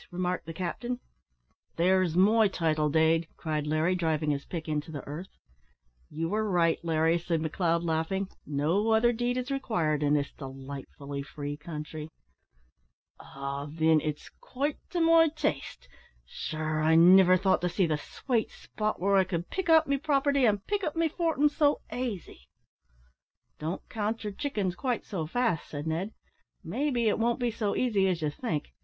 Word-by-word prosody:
remarked 180 -1 -2
the 165 - -5
captain. 240 +8 -3 0.8
"There's 180 -1 +2
my 215 +4 +5
title 155 -5 0
dade," 160 +2 +3
cried 155 -2 -2
Larry, 155 +4 +2
driving 160 -4 0
his 140 -1 -3
pick 165 -3 -6
into 150 0 -2
the 145 -4 -7
earth. 160 +7 -8 0.7
"You 165 +4 -3
are 215 0 0
right, 170 -3 +2
Larry," 165 +1 +2
said 170 -1 -1
McLeod, 165 +1 0
laughing, 165 +4 -1 0.2
"no 165 +10 +1
other 240 +2 +4
deed 245 +2 -1
is 255 +2 -3
required 175 - 0
in 145 0 +3
this 140 -1 -1
delightfully 140 +1 -7
free 145 +1 -6
country." 150 0 -7 1.1
"Ah! 140 +1 -6
thin, 160 -1 +4
it's 150 -1 -4
quite 285 +3 -4
to 350 - -1
my 330 0 +6
taste; 220 - -3 0.4
sure 155 - -3
I 160 +1 +4
niver 185 +2 +7
thought 190 0 +2
to 180 - 0
see 180 +2 +1
the 155 -2 0
swate 235 - -2
spot 215 0 -4
where 195 +2 +3
I 190 - +5
could 175 -2 -4
pick 380 -3 -2
out 320 -1 +6
me 280 0 +1
property 280 -2 +2
an' 205 -2 +1
pick 410 -1 -1
up 305 - -2
me 330 -1 +2
fortin' 320 -3 +1
so 295 0 +2
aisy." 210 - -5 1.1
"Don't 160 +4 -4
count 220 +1 -3
your 210 -1 -4
chickens 205 -8 -2
quite 245 +4 -2
so 165 -6 -4
fast," 230 -4 0
said 145 0 -5
Ned, 165 +6 -2 0.5
"may 295 +2 -1
be 240 -4 +1
it 215 - +1
won't 235 +3 +1
be 245 -1 0
so 215 -2 -2
easy 210 -6 +2
as 175 -4 -1
you 150 - 0
think. 155 - -4
180 Hz, 170 wpm, -29 LUFS, 155-230 Hz, 1.1 s, niver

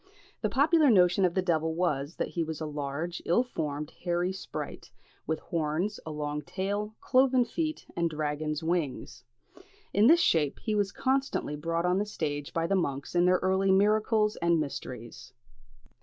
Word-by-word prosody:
The 215 - 0
popular 295 +5 +4
notion 185 -3 +5
of 175 - 0
the 185 - +1
devil 160 -2 0
was, 155 -3 -1
that - - -2
he 170 - -1
was 160 -1 -5
a 160 - -3
large, 150 +3 -4
ill 180 +9 +3
formed, 150 - -4
hairy 175 +1 0
sprite, 190 - -7 0.4
with 160 +1 0
horns, 165 +6 -2
a - - -3
long 150 -1 -3
tail, 205 +7 -3
cloven 255 -1 +3
feet, 315 +5 -3
and 170 -1 +1
dragon's 150 0 -2
wings. 165 -5 -2 0.7
In 205 +3 +5
this 335 +4 +7
shape 155 - +2
he 215 - -1
was 205 -2 +1
constantly 270 - -1
brought 165 +3 -2
on 180 +1 +2
the 210 - -1
stage 145 -7 -3
by 165 0 -1
the 195 - 0
monks 140 -6 -2
in 175 0 +3
their 180 0 +5
early 190 +1 +2
"miracles" 210 +2 +3
and 170 -1 +2
"mysteries." 125 -5 -6
175 Hz, 170 wpm, -29 LUFS, 155-205 Hz, 0.7 s, this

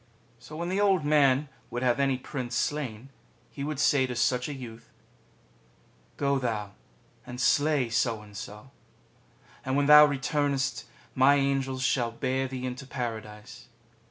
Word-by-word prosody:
So 125 +6 -12
when 170 +1 -3
the 195 +2 0
Old 190 -6 +2
Man 145 -1 +3 0.2
would 120 +1 -4
have 125 +1 +2
any 135 -2 +2
Prince 125 -2 -5
slain, 130 -2 -3 0.4
he 140 - -6
would 150 -1 -4
say 135 -3 +3
to 125 - -5
such 125 +2 0
a - - -4
youth: 115 -3 -10 0.6
" - - -34
Go 140 -1 +1
thou 110 -5 -3 0.5
and 125 0 -9
slay 145 0 +2
So 115 -1 0
and 105 -1 -15
So; 105 +5 -9 0.9
and 130 +1 -1
when 145 - +2
thou 150 +1 +9
returnest 140 -2 -1 0.3
my 135 +2 +5
Angels 135 -2 0
shall 125 -3 +1
bear 130 +3 -2
thee 130 -1 -5
into 130 +2 -6
Paradise. 115 -1 -7
130 Hz, 155 wpm, -27 LUFS, 120-140 Hz, 0.9 s, thou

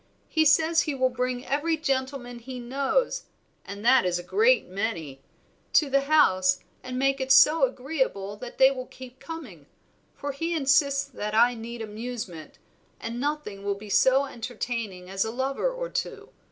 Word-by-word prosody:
He 315 -1 +2
says 320 +3 +4
he 300 -3 -2
will 260 -1 +1
bring 250 0 -2
every 315 +4 0
gentleman 260 -4 -3
he 250 +2 -8
knows 275 - -1 0.4
(and 200 +2 -8
that 260 +1 +6
is 180 -1 0
a 175 - -6
great 455 - +3
many) 180 -9 -4 0.5
to 295 -3 +4
the 275 0 +4
house, 185 -12 +3 0.2
and 255 0 -6
make 275 +1 +1
it 265 0 -1
so 310 - +7
agreeable 260 - -3
that 245 +2 -9
they 265 0 +6
will 255 -2 -6
keep 255 0 -12
coming; 245 - -9 0.5
for 285 - -4
he 330 +5 -3
insists 275 -1 +3
that 215 -6 -5
I 240 +2 +5
need 230 0 -7
amusement, 215 -6 -7 0.4
and 230 +1 -5
nothing 285 -8 -3
will 200 0 -1
be 205 +1 -11
so 265 +5 +4
entertaining 230 -6 -5
as 195 +1 -1
a 220 - -3
lover 265 - -1
or - - -4
two. - - -5
255 Hz, 165 wpm, -26 LUFS, 220-280 Hz, 0.5 s, so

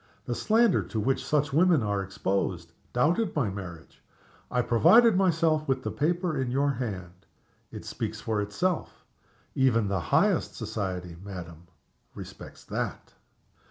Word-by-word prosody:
The - - -2
slander 225 -2 +3
to 110 - -4
which 130 +5 0
such 145 -2 0
women 165 -4 +4
are 100 -1 0
exposed 95 -3 -2 0.2
doubted 170 - +1
my 125 -10 +1
marriage. 85 -4 -9 0.5
I 125 0 +1
provided 220 - +6
myself 165 -4 +2
with 135 -1 0
the - - -2
paper 170 -1 0
in 130 - -2
your 140 +3 +1
hand. 95 -8 -6 0.4
It - - -8
speaks - - -4
for 110 -2 -1
itself. 170 - -2 0.5
Even 115 -6 +2
the 95 -1 0
highest - - +1
society, 90 -4 -4
madam, 85 -4 -9 0.5
respects - - -10
_that! - - -4
125 Hz, 135 wpm, -27 LUFS, 95-155 Hz, 0.5 s, provided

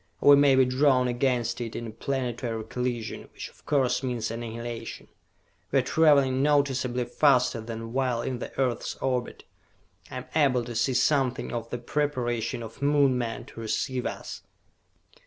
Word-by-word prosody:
Or 145 - +6
we - - +10
may 140 -1 +5
be 130 0 +5
drawn 130 0 +3
against 120 -1 0
it, 115 -2 -5
in 115 -2 -5
planetary 120 -2 -3
collision, 120 -1 -4
which - - -7
of - - -24
course 135 -4 +2
means 120 -4 -2
annihilation. 115 0 -6 0.6
We 140 - +3
are 130 - +3
traveling 140 -2 +4
noticeably 135 -4 +1
faster 125 -2 +3
than 115 0 -7
while 125 -3 0
in 125 -2 -3
the - - -6
earth's 125 -4 -1
orbit. 125 -2 -2 0.7
I - - -6
am 125 - -6
able 135 -6 +3
to 120 - -6
see 120 +3 0
something 130 -1 +1
of 115 -1 -4
the 120 - -3
preparation 120 -3 -2
of 115 +3 -10
Moon 140 -2 +3
men 120 -2 -3
to - - -12
receive 125 +3 -2
us!" - - -7
125 Hz, 160 wpm, -27 LUFS, 120-135 Hz, 0.7 s, we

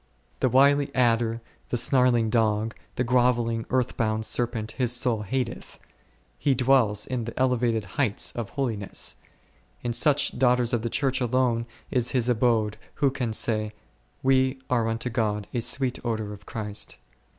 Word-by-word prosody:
The 130 - +2
wily 140 +3 +4
adder, 115 -2 +2 0.3
the 120 - 0
snarling 120 -3 +3
dog, 110 -1 +1 0.2
the 125 - 0
groveling, 120 -2 +1
earth 130 -1 0
bound 110 -1 0
serpent 115 -2 0
His 125 -3 0
soul 120 -3 +2
hateth, 120 +3 -4 0.6
He 140 -2 +2
dwells 125 -5 +3
in 125 -3 -3
the 115 - -7
elevated 120 -4 +1
heights 105 +3 -1
of 115 -4 -5
holiness; 115 -8 -3 0.7
in 120 -1 -1
such 145 0 +2
daughters 125 -2 +3
of 120 - +1
the 115 - -2
Church 135 +1 0
alone 120 -1 +1 0.2
is 125 -1 0
His 125 0 +1
abode 110 -3 +1 0.2
who 140 -2 +2
can 125 -4 -2
say, 110 -1 0 0.5
we 130 0 +3
are 115 -3 +2
unto 115 +2 -2
God 105 -2 -1
a 120 - -1
sweet 130 +2 -1
odour 110 -3 -3
of 100 - -14
Christ. 105 -3 -5
120 Hz, 150 wpm, -26 LUFS, 110-130 Hz, 0.7 s, wily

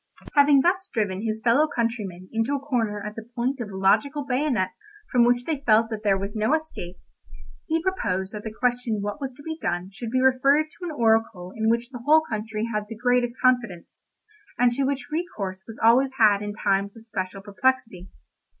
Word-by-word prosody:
Having 285 -1 +6
thus 375 +5 +1
driven 200 -4 -1
his 220 0 -3
fellow 260 +6 +4
countrymen 215 - -3
into 225 +5 0
a - - -2
corner 225 -7 -2
at 210 - -5
the 225 +1 -9
point 255 +3 -1
of 230 -4 -4
a 190 - -7
logical 280 +9 +2
bayonet 255 -7 0 0.4
from 245 -1 +5
which 245 +1 +2
they 305 -4 -2
felt 225 -3 +3
that 215 -1 -4
there 200 -2 +3
was 200 +2 -5
no 220 +8 +2
escape, 310 - -6 0.7
he 325 +1 0
proposed 190 - -1
that 210 -1 -6
the 220 - -5
question 240 -2 -1
what 205 +8 -4
was 270 -1 -3
to 285 - -14
be 320 +1 -5
done 175 +2 -2
should 225 +3 -6
be 255 +2 +1
referred 265 +3 +4
to 360 - -9
an 340 - -3
oracle 220 -5 +1
in 220 0 +1
which 235 +2 0
the 245 -3 -8
whole 310 +3 +6
country 215 0 -3
had 210 0 -1
the 225 - -7
greatest 245 0 +1
confidence, 245 -9 0 0.5
and 245 0 +4
to 270 +3 0
which 270 0 -3
recourse 200 - -4
was 225 - -10
always 260 +4 +5
had 210 -3 +5
in 205 0 -4
times 200 0 -1
of 225 - -12
special 195 -3 -5
perplexity. 205 -3 -1
230 Hz, 200 wpm, -25 LUFS, 205-265 Hz, 0.7 s, Having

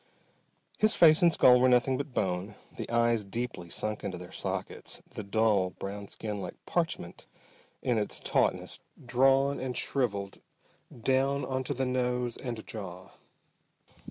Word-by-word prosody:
His 215 0 +4
face 155 -2 +7
and 170 -1 +6
skull 125 -5 +6
were 130 +1 +5
nothing 125 +1 +4
but 140 +1 -4
bone, 95 -1 -2 0.2
the - - -6
eyes 115 -1 +2
deeply 100 -4 -5
sunk 105 +4 -3
into 95 -2 -3
their 90 0 -10
sockets, - - -5
the - - -6
dull 100 -2 +2
brown 100 +1 -6
skin 105 -1 -5
like - - -6
parchment - - -3 0.6
in 120 -3 +2
its 105 - -1
tautness, - - 0 0.3
drawn 135 +3 +3
and 130 -1 -3
shriveled 100 -7 -2 0.6
down 135 +1 +2
onto 130 +1 -2
the 130 +1 0
nose 125 -1 0
and 120 -4 -6
jaw. 95 -4 -8
120 Hz, 140 wpm, -30 LUFS, 100-130 Hz, 0.6 s, face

